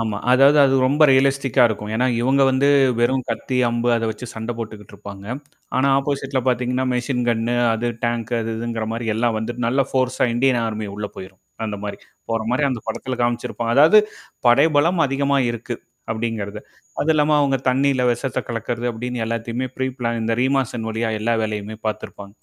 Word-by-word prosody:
ஆமா. 110 -2 -2 0.2
அதாவது 140 +3 +6
அது 135 - +3
ரொம்ப 145 +4 +2
ரியலிஸ்டிக்கா 135 -1 +3
இருக்கும். 105 -1 -5
ஏன்னா, 125 +3 +2
இவங்க 135 +3 +3
வந்து 135 +2 +2 0.3
வெறும் 130 +2 +1
கத்தி, 130 -1 -2
அம்பு 120 +1 -1
அத 115 - -1
வச்சு 110 +3 -7
சண்ட 110 +1 -5
போட்டுக்கிட்டு 110 -3 -8
இருப்பாங்க. 100 -1 -10 0.5
ஆனா 130 +2 +3
ஆப்போசிட்ல 135 -1 -2
பாத்தீங்கன்னா, 125 +1 0
மெஷின் 125 0 -1
கண் 115 -1 +1
ணு 120 - +1 0.2
அது 115 +2 -2 0.2
டேங்க் 120 0 -2
அது 115 0 -3
இதுங்கிற 115 -1 -3
மாரி 115 0 -4
எல்லாம் 115 0 0
வந்துட்டு 120 +2 -3
நல்ல 135 +3 +2
ஃபோர்ஸா 130 -1 +1
இந்தியன் 125 0 +2
ஆர்மி 110 -1 -4
உள்ள 105 0 -4
போயிரும், 95 0 -10 0.3
அந்த 105 -1 -4
மாரி 100 - -5 0.3
போற 115 0 0
மாரி 130 - +1
அந்த 120 - -3
படத்தில 120 +3 -3
காமிச்சிருப்பா. 120 0 -2
அதாவது 155 - +7 0.5
படைபலம் 150 +6 +4
அதிகமா 140 +1 +1
இருக்கு. 120 +1 -5 0.3
அப்டிங்கிறது, 110 -2 -3 0.4
அதுவும் 160 +2 +3
இல்லாம 150 0 +2
அவங்க 140 -2 +2
தண்ணீில 135 0 +2
விஷத்த 125 +3 -2
கலக்கிறது 120 +1 -3
அப்டின்னு 120 +1 -4
எல்லாத்தையுமே 115 +2 -3
ப்ரீப்ளான் 125 -3 -2
இந்த 110 +1 -1
ரீமாசன் 130 -3 0
வழியா 110 +1 -2
எல்லா 115 +2 0
வேலையுமே 105 -1 -3
பாத்துருப்பாங்க. 100 -1 -5
120 Hz, 170 wpm, -21 LUFS, 110-130 Hz, 0.5 s, அதாவது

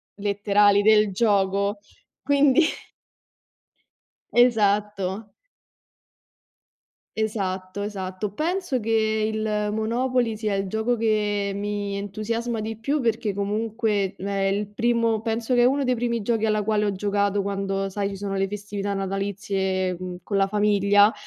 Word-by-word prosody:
letterali 205 0 +3
del 215 -1 +4
gioco, 200 -1 +1 0.5
quindi 285 +1 +4 1.7
Esatto. 210 -3 +2 1.9
Esatto, 195 -3 -2
esatto. 195 -1 -4
Penso 335 - -1
che 220 -1 +1
il 215 -1 -1
Monopoly 235 +2 0
sia 210 -2 -2
il 195 0 -1
gioco 220 +4 0
che 210 -2 0
mi 205 0 -3
entusiasma 220 +3 -3
di 220 +1 -4
più 275 +7 -1
perché 225 -3 -1
comunque 210 -1 -1
è 200 +2 -4 0.2
il 200 +1 -1
primo 230 -1 +1
penso 225 +2 -1
che 245 - +4
è 240 - +5
uno 275 +2 +2
dei 255 -1 +2
primi 235 -2 -1
giochi 225 0 +1
alla 215 -1 +1
quale 210 0 +1
ho 205 - +1
giocato 200 0 0
quando 195 0 -2
sai 200 +1 -2
ci 195 - -6
sono 195 0 -4
le 195 0 0
festività 205 0 -4
natalizie 195 -1 -2 0.3
con 200 0 -2
la 195 - +3
famiglia, 205 0 +4
210 Hz, 125 wpm, -24 LUFS, 200-225 Hz, 1.9 s, è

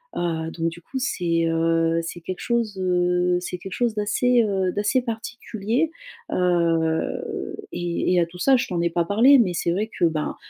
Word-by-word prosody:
heu. 165 -2 -2
Donc 165 0 -1
du 170 +1 -11
coup, 265 - -7
c'est, 170 -9 0
heu 165 0 +2
c'est 170 +1 -6
quelque 180 +2 -6
chose, 235 -3 -1
heu 180 0 +2
c'est 180 - -5
quelque 190 +1 -8
chose, 240 -3 0
d'assez, 235 +4 +2
heu 190 -3 0
d'assez 210 +5 +1
particulier, 230 +4 -2 0.4
heu, 165 -3 0 0.2
et 175 +1 -1
et 180 - +4
à - - +2
tout 175 +2 -13
ça 270 +7 +4
je - - -1
t'en 175 -2 -2
ai 170 - +1
pas 170 0 0
parlé, 240 +9 +6
mais 190 -7 +2
c'est 170 - -1
vrai 210 +5 -1
que 175 - +4
ben, 160 -2 -1
180 Hz, 190 wpm, -23 LUFS, 170-215 Hz, 0.4 s, parlé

